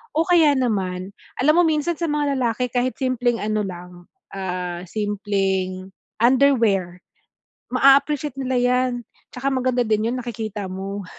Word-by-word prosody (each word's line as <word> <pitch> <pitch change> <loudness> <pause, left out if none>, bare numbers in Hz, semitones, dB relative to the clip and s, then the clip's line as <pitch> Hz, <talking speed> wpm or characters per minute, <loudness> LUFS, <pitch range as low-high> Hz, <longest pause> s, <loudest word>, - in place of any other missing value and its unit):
O 320 +2 +2
kaya 330 -5 +5
naman, 190 -7 -1 0.3
alam 300 +4 +5
mo 350 - +6
minsan 315 +2 0
sa 340 - -2
mga 290 -2 0
lalaki 245 -1 0
kahit 250 +1 0
simpleng 250 -3 0
ano 215 0 0
lang, 180 -1 -9 0.3
ah, 180 -2 -4
simpleng 195 -3 -2 0.3
underwear, 230 -9 +3 0.7
maa-appreciate 275 +1 +3
nila 260 -1 -1
yan, 250 +1 +2 0.4
tsaka 255 +2 -2
maganda 255 -1 +1
din 215 +1 +1
yun, - - -2
nakikita 220 -4 -5
mo. 195 +1 -5
235 Hz, 135 wpm, -22 LUFS, 195-260 Hz, 0.7 s, mo